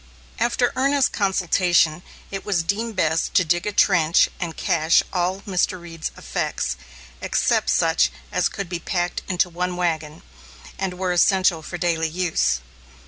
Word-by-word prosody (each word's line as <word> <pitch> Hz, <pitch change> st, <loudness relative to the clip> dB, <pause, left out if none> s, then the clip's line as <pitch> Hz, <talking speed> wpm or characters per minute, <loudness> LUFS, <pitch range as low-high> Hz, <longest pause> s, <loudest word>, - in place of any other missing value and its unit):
After 240 Hz, +1 st, +1 dB
earnest 275 Hz, +1 st, +2 dB
consultation, 180 Hz, -4 st, +2 dB, 0.3 s
it 195 Hz, -1 st, -5 dB
was 190 Hz, -5 st, 0 dB
deemed 215 Hz, +5 st, -2 dB
best 160 Hz, -3 st, 0 dB
to 185 Hz, -, +4 dB
dig 175 Hz, +4 st, 0 dB
a -, -, 0 dB
trench 175 Hz, -5 st, +4 dB
and 170 Hz, -3 st, -4 dB
cache 160 Hz, 0 st, +3 dB
all 185 Hz, +1 st, -1 dB
Mr. 185 Hz, -1 st, -1 dB
Reed's 165 Hz, -2 st, -6 dB
effects, 65 Hz, -, -2 dB, 0.5 s
except -, -, +1 dB
such -, -, +3 dB, 0.2 s
as -, -, +1 dB
could 200 Hz, -, -5 dB
be 175 Hz, 0 st, -4 dB
packed 175 Hz, 0 st, -2 dB
into 180 Hz, 0 st, +1 dB
one 180 Hz, +1 st, -3 dB
wagon, 160 Hz, -4 st, -2 dB, 0.6 s
and 190 Hz, -2 st, -2 dB
were 185 Hz, -1 st, -1 dB
essential 180 Hz, -1 st, +3 dB
for 175 Hz, +3 st, -7 dB
daily 165 Hz, -2 st, 0 dB
use. 165 Hz, -, 0 dB
180 Hz, 145 wpm, -22 LUFS, 165-195 Hz, 0.6 s, to